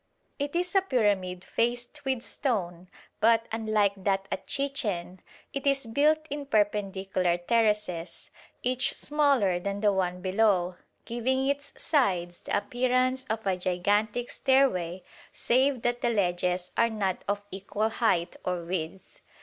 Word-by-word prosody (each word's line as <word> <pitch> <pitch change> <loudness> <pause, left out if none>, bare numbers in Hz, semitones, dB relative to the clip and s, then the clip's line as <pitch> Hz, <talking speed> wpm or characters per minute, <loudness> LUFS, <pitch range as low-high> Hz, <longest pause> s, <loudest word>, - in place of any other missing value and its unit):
It 285 +3 -3
is 360 +1 0
a 390 - +5
pyramid 200 - 0
faced 240 +7 -1
with 260 -3 -1
stone, 185 - -2 0.3
but, 225 +1 +4
unlike 215 -3 +1
that 195 0 0
at - - -4
Chichen, 210 -11 -2 0.3
it 275 0 -3
is 275 -1 +2
built 300 +7 +2
in 290 -1 -4
perpendicular 195 -5 +1
terraces, 210 -3 0 0.3
each 255 +1 +1
smaller 275 -11 +2
than 200 +2 -3
the 205 -2 +3
one 180 -1 -1
below, 185 -2 +1 0.3
giving 260 +3 0
its 280 +1 -1
sides 180 - +1
the - - -1
appearance 255 +3 0
of 220 0 -2
a 190 -1 +2
gigantic 205 +6 0
stairway, 190 -10 +2 0.3
save 260 0 +1
that 240 0 0
the 240 - +2
ledges 180 -3 0
are 230 - +3
not 200 -4 -2
of 205 0 -1
equal 200 +3 -2
height 220 -7 +1
or 180 -1 -2
width. 175 +1 -5
215 Hz, 135 wpm, -28 LUFS, 185-255 Hz, 0.3 s, a